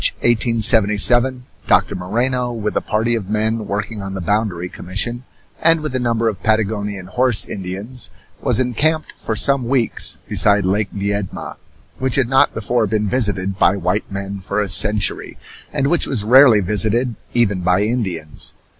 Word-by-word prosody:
In - - 0
March, - - +3
1877, 120 +2 +2 0.2
Doctor - - +3
Moreno 120 +7 -1
with 105 -2 -3
a - - +1
party 110 +2 -1
of 105 -5 -3
men 110 0 -1
working 105 +1 -3
on 95 0 -6
the - - -4
boundary 95 -2 -1
commission, 110 +8 -3 0.4
and 165 0 +4
with 150 -3 -4
a 130 - 0
number 115 -2 0
of 100 -5 -3
Patagonian 105 -3 -1
horse 120 +4 +2
Indians, 100 +6 -5 0.3
was - - +3
encamped 150 +6 0
for 110 - -4
some 130 +3 +2
weeks 125 -3 +1
beside 100 -2 +2
Lake 100 +2 0
Viedma, 100 -1 -4 0.4
which 130 -1 0
had 135 -3 +2
not 135 0 +4
before 115 +1 0
been 105 +1 -1
visited 100 -5 0
by - - +4
white 90 +3 -2
men 100 0 -5
for 100 +2 -3
a 105 - 0
century, 105 +3 +1 0.3
and 135 - -1
which 170 +4 +1
was 115 -7 +1
rarely 120 -1 +6
visited 110 +5 +1 0.2
even 105 -6 +2
by 90 +2 +2
Indians. 100 -9 -3
110 Hz, 165 wpm, -18 LUFS, 100-120 Hz, 0.4 s, rarely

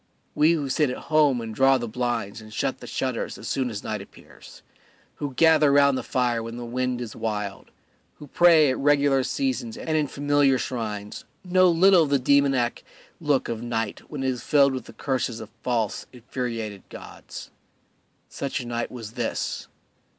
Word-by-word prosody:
We 155 +3 +4
who 150 -4 -1
sit 145 +1 +1
at 125 - -4 0.2
home 145 -5 +4
and 110 -1 -6
draw 135 +3 +4
the 120 -2 -4
blinds 115 -3 -3
and 110 0 -13
shut - - -2
the - - -10
shutters - - -3
as - - -9
soon 130 -2 -1
as 105 -3 -6
night 105 -2 -3
appears, 100 - -15 0.5
who 140 -3 -5
gather 155 -2 +5
round 140 -1 +5
the - - -2
fire 120 -3 0
when 115 +1 -7
the 120 - -6
wind 125 +1 -2
is 115 -3 -6
wild, 105 -3 -4 0.5
who 150 - -11
pray 160 -1 +5
at - - -3
regular 140 -1 +3
seasons 245 - -2
and 160 -10 -2
in 150 -2 +1
familiar 145 -1 +2
shrines, 105 -5 -5 0.2
know 185 0 +4
little 180 +2 +5
of 155 - +1
the 140 - +3
demoniac 135 -2 +2 0.4
look 145 -4 +1
of 115 -1 -4
night 115 -3 -3
when 145 -3 -5
it 130 - +1
is 125 -3 -3
filled 140 0 +4
with 130 - -6
curses 130 -4 -2
of 110 0 -10
false, 115 -5 -1
infuriated 115 -4 -5
gods. - - -10 0.8
Such 140 0 -4
a 125 - -6
night 120 0 -3
was 115 -4 -8
this. - - -3
130 Hz, 180 wpm, -25 LUFS, 115-145 Hz, 0.8 s, gather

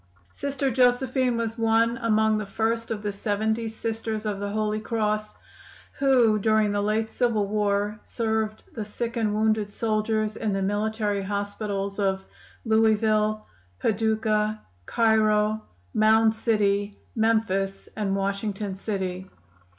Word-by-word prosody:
"Sister 275 - -2
Josephine 250 0 +2
was 230 0 -3
one 230 +1 +3
among 220 -3 +2
the 210 - -4
first 225 +3 -1
of 215 -2 -4
the 205 - -1
seventy 220 +3 -1
Sisters 220 -1 -4
of 205 -2 -2
the 205 0 -3
Holy 215 +1 -1
Cross 215 -1 -1 0.6
who, 245 -6 +4
during 215 0 +2
the 205 0 0
late 215 +2 0
civil 230 -4 +1
war, 205 0 0
served 220 -2 -2
the 220 - -4
sick 230 +3 -4
and 220 -3 +1
wounded 215 -1 +1
soldiers 215 0 -1
in 215 -3 -1
the 195 - -1
military 205 0 0
hospitals 200 0 -3
of 190 -1 0 0.4
Louisville, 215 -1 +2 0.3
Paducah, 215 - +1 0.3
Cairo, 215 -1 +2 0.3
Mound 220 +1 +4
City, 205 -2 0 0.2
Memphis 220 -4 0
and 200 -3 -1
Washington 200 +1 -2
city. 190 -2 -4
215 Hz, 125 wpm, -25 LUFS, 205-225 Hz, 0.6 s, who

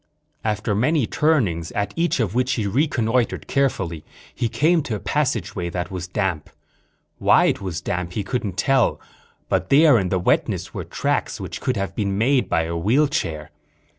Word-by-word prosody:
After 105 -1 -1
many 130 +6 +2
turnings, 105 - +1
at 100 0 -2
each 170 -3 +1
of 105 -5 0
which 125 +1 +1
he 110 - -1
reconnoitered 120 0 0
carefully, 95 - -1 0.3
he 115 - -1
came 155 +9 +2
to 120 -6 -3
a - - -4
passageway 105 - -1
that 90 +1 -4
was 90 -2 -5
damp. 90 -5 -2 0.7
Why - - +5
it - - +1
was 90 -3 -4
damp 90 -1 -3
he 105 - -2
couldn't 105 -4 -3
tell, 135 +4 +2 0.5
but - - 0
there 145 -3 +6
in 95 -2 -1
the 95 - +1
wetness 90 - 0
were - - -5
tracks - - -1
which - - -6
could 130 -3 -1
have 100 0 -3
been 100 -2 -1
made 130 +4 +2
by 80 - +2
a 85 +1 -3
wheelchair. 105 - 0
105 Hz, 170 wpm, -22 LUFS, 90-130 Hz, 0.7 s, there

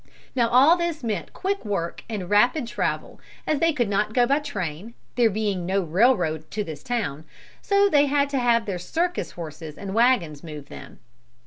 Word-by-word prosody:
Now 235 -3 +2
all 275 +8 +6
this 340 -4 -2
meant 210 -7 -3
quick 395 +1 -2
work 185 -6 -3
and 205 -5 -4
rapid 240 - +3
travel, 235 - -3 0.2
as 305 -2 0
they 330 +1 +3
could 245 -7 0
not 210 +2 -1
go 245 -1 +5
by 280 +4 +2
train, 200 - -5 0.2
there 240 -2 +3
being 205 -3 -1
no 190 +2 0
railroad 170 - +2
to 210 - -2
this 155 -5 -8
town, 205 - -3 0.4
so 400 -1 +3
they 290 -6 +4
had 285 0 +2
to 275 - 0
have 235 -2 +2
their 190 -4 -3
circus 340 - -2
horses 155 -2 -8
and 195 -1 -6
wagons 225 - +2
move 150 -3 -9
them. - - -11
220 Hz, 185 wpm, -24 LUFS, 175-275 Hz, 0.4 s, all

